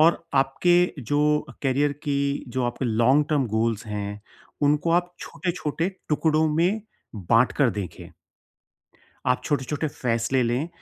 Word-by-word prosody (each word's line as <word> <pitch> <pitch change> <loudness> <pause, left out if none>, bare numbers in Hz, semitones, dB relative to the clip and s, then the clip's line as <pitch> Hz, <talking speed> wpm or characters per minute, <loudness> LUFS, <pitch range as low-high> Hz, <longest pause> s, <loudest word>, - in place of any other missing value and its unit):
और 165 +1 +4
आपके 175 +7 +3
जो 145 +6 0 0.3
अ, - - -10
करियर 140 +2 +2
की 140 -1 -1
जो 130 +1 -2
आपके 120 +2 -2
लॉन्ग-टर्म 135 +5 +2
गोल्स 115 0 0
हैं, 105 -1 -4 0.4
उनको 150 +3 +2
आप 175 +1 +1
छोटे-छोटे 170 -2 -3 0.2
टुकड़ों 155 +1 +2
में 180 +7 +2 0.4
बाँट 115 +6 +3
कर 135 -5 +3
देखें। 90 -4 -8 1.2
आप - - +2
छोटे-छोटे 145 +2 -1
फ़ैसले 125 -1 0
लें 125 +7 -1
140 Hz, 130 wpm, -24 LUFS, 120-155 Hz, 1.2 s, और